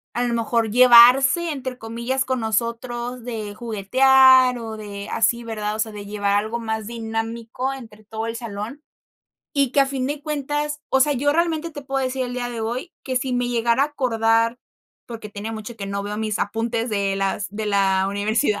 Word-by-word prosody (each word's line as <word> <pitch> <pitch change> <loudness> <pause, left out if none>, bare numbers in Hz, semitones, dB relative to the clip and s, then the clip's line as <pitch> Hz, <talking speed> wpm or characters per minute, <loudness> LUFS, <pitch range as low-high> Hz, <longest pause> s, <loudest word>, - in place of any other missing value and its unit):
a 240 - 0
lo 240 -1 0
mejor, 230 0 0
llevarse, 255 - +7
entre 260 -3 -5
comillas, 235 +4 -2
con 260 0 -2
nosotros, 235 +2 -3
de 220 -4 -5
juguetear 255 +4 +5
o 225 -1 -6
de 205 -1 -7
así, 235 +1 +1
¿verdad? 215 -2 -3
O - - -7
sea, 220 0 -1
de 205 -1 -8
llevar 205 -1 -1
algo 220 +3 -2
más 220 -1 -3
dinámico 230 +3 -4
entre 225 -5 -12
todo 220 +1 -5
el 230 - -4
salón. 230 +4 -6 0.7
Y 280 -3 +2
que, 280 - +4
a 275 - +4
fin 270 -1 -2
de 290 +1 -3
cuentas, 295 0 -3
o 265 - +3
sea, 290 +2 +3
yo 290 +3 +1
realmente 330 0 0
te 295 - -8
puedo 270 -1 -2
decir 260 0 -2
el 245 - -6
día 245 -1 -3
de 235 -1 -5
hoy 240 +10 -4
que, 260 -1 -3
si 255 0 -1
me 245 0 0
llegara 235 +1 +2
a - - -1
acordar, 230 -4 +1 0.5
porque 225 -3 -8
tiene 205 +2 -6
mucho 220 +1 -7
que 200 -3 -6
no 200 0 -3
veo 210 +1 -5
mis 215 -1 -2
apuntes 225 +2 -2
de 200 -2 0
las 195 +1 -1
de 210 +2 -5
la 195 -2 +2
universidad. 210 +3 0
235 Hz, 195 wpm, -22 LUFS, 215-260 Hz, 0.7 s, llevarse